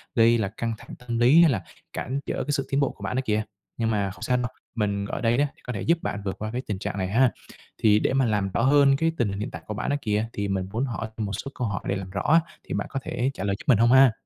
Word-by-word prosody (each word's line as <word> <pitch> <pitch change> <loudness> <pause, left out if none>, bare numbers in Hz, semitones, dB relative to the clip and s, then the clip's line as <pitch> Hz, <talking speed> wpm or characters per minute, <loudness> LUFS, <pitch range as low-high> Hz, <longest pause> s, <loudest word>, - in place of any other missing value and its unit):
gây 115 0 +5
là 105 -3 0
căng 115 -1 -1
thẳng - - -11
tâm 120 -1 -3
lý, 135 +8 +7
hay 165 -4 +6
là 95 -6 -1 0.3
cản 135 +2 -2
trở - - -2
cái 145 - -2
sự 135 -1 -1
tiến 140 - +1
bộ 140 - +2
của - - -14
bạn - - -2
đó 130 - +1
kìa. 110 0 +1 0.3
Nhưng 115 -1 0
mà 100 -3 0
không 95 - -14
sao 125 0 +1
đâu, 125 - -1 0.3
mình 100 -2 0
ở - - -4
đây 115 +1 +2
đó, 145 - +4
thì - - -25
có 125 - -4
thể 100 - -4
giúp 170 +1 +3
bạn 100 - -3
vượt 95 - -3
qua 110 +1 -3
cái 125 +1 -2
tình 100 -3 -3
trạng 100 - -4
này 95 -1 -1
ha. 120 +5 +4 0.5
Thì 105 -1 +4
để - - +1
mà 135 -2 +3
làm 105 -3 +1
rõ - - +1
hơn 140 +1 +5
cái 165 +1 +2
tình 115 -4 +1
hình 100 +1 -4
hiện 105 - -4
tại 80 - -7
của 110 - -3
bạn 105 - -2
ấy - - +1
kìa, 105 +1 0
thì 100 0 -2
mình 95 -1 -1
muốn 120 +5 0
hỏi 115 -2 -4
thêm 110 - -1
một 100 - -4
số 135 +8 -5
câu 125 - -1
hỏi 100 -2 -3
để 100 - 0
làm 95 -1 -5
rõ 95 0 -3
á, 165 +1 +5 0.2
thì - - -6
bạn - - -2
có 135 - -2
thể 125 +3 -1
trả 95 - -5
lời 100 -1 0
giúp - - -10
mình 125 -6 +6
hông 120 +2 +4
ha? 130 -2 +8
115 Hz, 325 wpm, -25 LUFS, 100-130 Hz, 0.5 s, ha